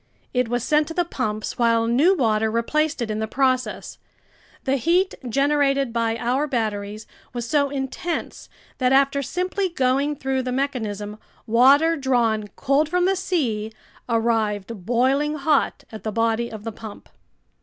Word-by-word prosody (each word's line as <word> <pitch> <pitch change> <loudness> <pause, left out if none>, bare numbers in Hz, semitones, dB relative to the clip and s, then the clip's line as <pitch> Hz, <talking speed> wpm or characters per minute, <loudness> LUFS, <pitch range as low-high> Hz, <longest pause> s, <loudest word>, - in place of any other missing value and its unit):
It 250 -1 +1
was 240 0 -1
sent 300 +2 +2
to 325 - -7
the 350 - +1
pumps 215 -9 -3
while 230 -1 +3
new 280 +12 +4
water 220 -4 +2
replaced 265 +5 0
it 220 - -3
in 215 - -2
the 220 - -2
process. 255 +1 -1 0.6
The 270 0 +1
heat 350 +8 +2 0.2
generated 275 -1 +2
by 230 -1 0
our 255 +5 0
batteries 215 -4 -3 0.3
was 240 -1 -4
so 285 +1 +2
intense 280 +5 -4 0.3
that 255 -1 +2
after 275 +1 +3
simply 365 +6 -2
going 275 -1 +1
through 265 -1 -1
the 255 0 -3
mechanism, 215 -6 -3 0.3
water 275 +8 +5
drawn 235 -6 +1
cold 280 +3 +1
from 360 +1 +2
the 385 +1 +2
sea 255 - -1 0.4
arrived 225 -3 -1
boiling 270 +5 +2
hot 295 -1 +1
at 220 - -8
the 215 - -3
body 230 +1 0
of 215 -2 -8
the 225 - -4
pump. 215 -1 -10
255 Hz, 155 wpm, -23 LUFS, 225-285 Hz, 0.6 s, water